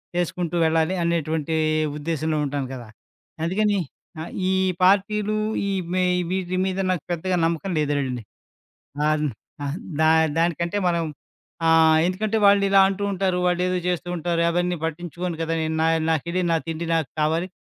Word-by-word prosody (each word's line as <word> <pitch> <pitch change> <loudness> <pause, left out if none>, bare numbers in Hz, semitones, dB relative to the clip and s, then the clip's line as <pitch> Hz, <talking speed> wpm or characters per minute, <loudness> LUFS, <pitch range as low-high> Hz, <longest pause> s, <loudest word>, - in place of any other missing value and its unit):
చేసుకుంటూ 175 0 -1
వెళ్ళాలి 160 +3 +2
అనేటువంటి 160 -2 -1 0.4
ఉద్దేశ్యంలో 155 0 -1
ఉంటాను 140 -1 -3
కదా! 120 -3 -9 0.6
అందుకని 205 +4 +1 0.4
ఆహ్, 165 - -7 0.2
ఈ - - +2 0.3
పార్టీలు 205 +3 +3 0.3
ఈ - - -1 0.2
మె 185 - +2 0.3
వీటి 185 -1 -2
మీద 190 0 -2
నాకు 180 -5 -1
పెద్దగా 180 +2 -1
నమ్మకం 170 +3 -1
లేదులెడండి. 140 -5 -1 0.8
ఆహ్, 155 0 +1 0.4
ఆ! - - -2 0.3
దా 160 0 +5 0.3
దానికంటే 170 +3 0
మనం 170 -1 0 0.6
ఆహ్, 160 -1 +6
ఎందుకంటే 215 +4 0
వాళ్ళిలా 200 -1 +5
అంటూ 195 +1 -3
ఉంటారు. 185 -1 0
వాళ్ళేదో 180 +1 +1
చేస్తూ 180 0 -2
ఉంటారు. 170 0 0
అవన్నీ 175 +1 0
పట్టించుకోను 170 +1 -4
కదా! 165 0 -1
నేను 160 0 -1
నా 160 - +3 0.2
నాకెళ్లి, 170 +3 0
నా 165 - +4
తిండి 165 +1 -3
నాకు 160 -4 -1
కావాలి. 160 +4 +1
170 Hz, 140 wpm, -23 LUFS, 160-185 Hz, 0.8 s, ఆహ్